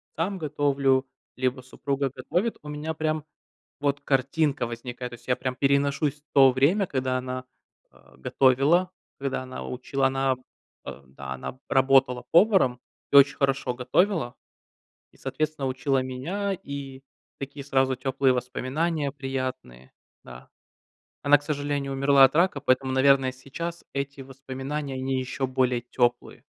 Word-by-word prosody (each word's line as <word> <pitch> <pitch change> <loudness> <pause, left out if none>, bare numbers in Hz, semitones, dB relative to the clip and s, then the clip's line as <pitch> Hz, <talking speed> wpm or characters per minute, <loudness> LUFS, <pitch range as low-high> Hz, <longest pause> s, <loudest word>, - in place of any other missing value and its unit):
сам 185 +5 -1
готовлю, 140 -4 +1 0.3
либо 130 0 -1
супруга 140 +2 -2
готовит- 180 - -1
у 150 - -9
меня 150 +2 -4
прям 155 -1 -1 0.6
вот 140 0 0
картинка 135 0 +1
возникает. 120 +1 -6
То - - -7
есть - - -20
я 125 - +2
прям 130 0 -3
переношусь 140 +2 +1
в 150 - -57
то 135 -2 +7
время, 160 +10 +2
когда 130 -3 -1
она, 130 0 -5 0.5
а, - - -22
готовила, 140 - +3 0.3
когда 135 -1 -2
она 130 0 -7
учила. 135 +2 -1
Она, 135 0 +1 0.5
а, 70 - -9
да, 65 0 -7
она 65 - -6
б 130 - -26
работала 130 -1 +3
поваром 170 - +4 0.3
и - - +1
очень 140 +1 +7
хорошо 135 -2 0
готовила, 155 +1 +1 0.8
и, - - -24
соответственно, 155 -3 -2
учила 130 +1 0
меня, 170 +11 -3
и 140 -6 -7 0.4
такие 140 0 -7
сразу 135 -1 +2
теплые 130 +1 +1
воспоминания 140 +5 -2
приятные. 130 - -5 0.3
Да. 65 0 -12 0.7
Она, 145 0 +6
к 145 - -18
сожалению, 145 -2 -2
умерла 140 0 +5
от 135 - 0
рака, 170 -4 +2
поэтому, 130 -1 +1
наверное, 130 0 +4
сейчас 165 +6 -7
эти 140 0 -4
воспоминания- 135 +2 -5
они 130 0 -1
еще 130 +1 -3
более 130 -2 +1
теплые. 120 0 -1
135 Hz, 140 wpm, -26 LUFS, 130-145 Hz, 0.8 s, то